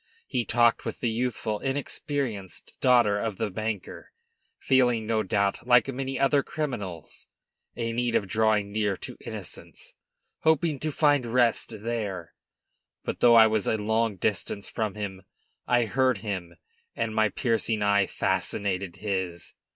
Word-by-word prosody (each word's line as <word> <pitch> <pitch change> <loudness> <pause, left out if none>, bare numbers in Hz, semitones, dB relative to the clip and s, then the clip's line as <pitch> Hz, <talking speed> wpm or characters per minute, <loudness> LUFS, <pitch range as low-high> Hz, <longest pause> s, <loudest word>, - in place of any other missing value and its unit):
He 120 -2 -1
talked 120 +1 +3
with - - -5
the 120 - 0
youthful, 110 -2 -2
inexperienced 135 - -3
daughter 120 -5 +4
of 110 -3 -3
the 110 -3 -2
banker, 110 0 -5 0.5
feeling, 125 -4 +2
no 110 0 +1
doubt, 100 +2 0
like 125 0 +5
many 135 +1 -3
other 140 +1 +4
criminals, 105 - -5 0.5
a 115 -1 -2
need 120 0 0
of 100 - +1
drawing 105 0 +1
near 105 -2 0
to - - -7
innocence, - - -7 0.5
hoping 160 -2 +2
to 155 +2 -2
find 145 -4 +3
rest 115 -2 +1
there. 105 -7 -3 0.7
But, - - -4
though 120 -1 +6
I 110 -1 +9
was 110 -2 +1
a 110 - +2
long 110 0 0
distance 100 +1 -2
from 110 -3 -3
him, 100 -3 -5 0.5
I 120 -1 +3
heard 130 +1 +2
him, 95 -5 -4 0.4
and 110 - -2
my 110 -1 +3
piercing 110 0 0
eye 100 -1 +3
fascinated 95 -3 -1
his. 95 -5 -3
110 Hz, 145 wpm, -27 LUFS, 100-125 Hz, 0.7 s, I